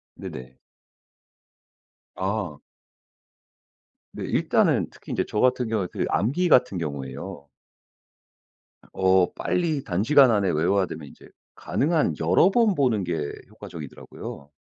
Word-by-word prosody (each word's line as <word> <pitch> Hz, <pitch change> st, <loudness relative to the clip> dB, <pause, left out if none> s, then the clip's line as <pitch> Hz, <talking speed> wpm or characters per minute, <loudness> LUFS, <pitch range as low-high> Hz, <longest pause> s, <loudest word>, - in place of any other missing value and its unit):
네네. 65 Hz, 0 st, -9 dB, 1.6 s
아. 95 Hz, -5 st, -3 dB, 1.6 s
네. -, -, -5 dB
일단은 -, -, +2 dB
특히 -, -, -12 dB
이제 -, -, 0 dB
저 105 Hz, -, -2 dB
같은 125 Hz, -1 st, +2 dB
경우는 105 Hz, -5 st, -1 dB
그 -, -, -2 dB
암기 140 Hz, -, +1 dB
같은 125 Hz, -, +4 dB
경우에요. 70 Hz, -2 st, -6 dB, 1.4 s
어 95 Hz, -1 st, +3 dB
빨리 160 Hz, -6 st, -1 dB
단시간 120 Hz, +8 st, +4 dB
안에 100 Hz, -3 st, +2 dB
외워야 90 Hz, +5 st, +2 dB
되면 75 Hz, -3 st, -8 dB
이제 -, -, -16 dB, 0.3 s
가능한 155 Hz, +2 st, 0 dB
여러 185 Hz, -, +4 dB
번 225 Hz, -3 st, +3 dB
보는 125 Hz, -, +1 dB
게 80 Hz, -4 st, -3 dB, 0.2 s
효과적이더라고요. 75 Hz, -2 st, -10 dB
100 Hz, 240 characters per minute, -25 LUFS, 85-130 Hz, 1.6 s, 같은